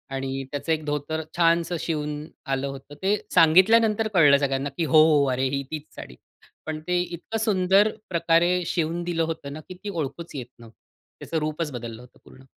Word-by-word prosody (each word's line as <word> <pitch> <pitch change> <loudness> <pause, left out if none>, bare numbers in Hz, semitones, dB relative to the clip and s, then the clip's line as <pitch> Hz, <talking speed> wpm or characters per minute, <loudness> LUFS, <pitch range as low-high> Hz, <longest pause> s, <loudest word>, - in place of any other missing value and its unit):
आणि 135 0 -3
त्याचं 145 +3 -3
एक 155 -1 0
धोतर 150 +2 -2 0.2
छानसं 170 0 +2
शिवून 150 -2 -3 0.2
आलं 135 0 -1
होतं. 135 +1 -9
ते 200 +2 +3 0.2
सांगितल्यानंतर 210 +6 +5
कळलं 145 -6 +6
सगळ्यांना 140 0 -1
की 170 - 0
"हो, 155 +2 +6
हो, 145 -1 +4
अरे, 130 +1 0
ही 140 0 -2
तीच 155 -2 -4
साडी." 60 - -10 0.5
पण 155 -1 -4
ते 180 0 +2
इतकं 175 +5 -5
सुंदर 195 0 +3 0.2
प्रकारे 175 +1 +2
शिवून 170 +1 -1
दिलं 170 -1 -1
होतं 160 -3 -5
ना, 155 - -7
की - - -6
ती 210 - -4
ओळखूच 165 -2 -5
येत 125 -3 -5
नव्हती. 115 -1 -15 0.4
त्याचं 165 - -4
रूपच 155 0 -3
बदललं 120 -2 -7
होतं 125 - -18
पूर्ण. 130 - -17
155 Hz, 180 wpm, -25 LUFS, 140-175 Hz, 0.5 s, कळलं